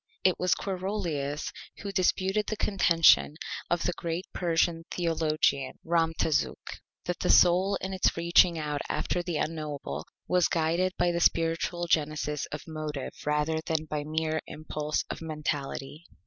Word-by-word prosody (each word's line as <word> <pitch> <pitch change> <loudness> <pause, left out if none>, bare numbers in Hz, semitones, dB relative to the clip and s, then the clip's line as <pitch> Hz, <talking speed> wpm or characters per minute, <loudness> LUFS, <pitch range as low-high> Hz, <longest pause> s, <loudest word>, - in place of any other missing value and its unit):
It 185 - +3
was 180 0 +3
Quarolius 180 -7 -3 0.3
who 200 - -5
disputed 190 +2 +1
the 215 - -2
Contention 170 -7 +4 0.3
of 175 -1 +1
the 180 - 0
great 170 +2 -3
Persian 165 -1 +1
Theologian 155 -5 0
Ramtazuk, 165 -2 0 0.3
that 175 -1 -2
the - - -1
Soul 185 +3 +5
in 190 0 -3
its 185 - +1
reaching 170 0 +4
out 150 -2 -2
after 180 - -1
the 175 -3 -3
Unknowable 155 -3 -4 0.2
was 180 -1 +3
guided 170 +3 +1
by 175 0 +2
the 170 - -1
Spiritual 165 +1 +1
Genesis 150 -2 0
of 150 - -6
Motive 155 -3 -5
rather 150 +2 +1
than 160 -1 0
by 150 -1 -3
mere 155 +1 -1
Impulse 150 0 -3
of - - -6
Mentality. 150 -1 -4
165 Hz, 140 wpm, -28 LUFS, 155-175 Hz, 0.3 s, Soul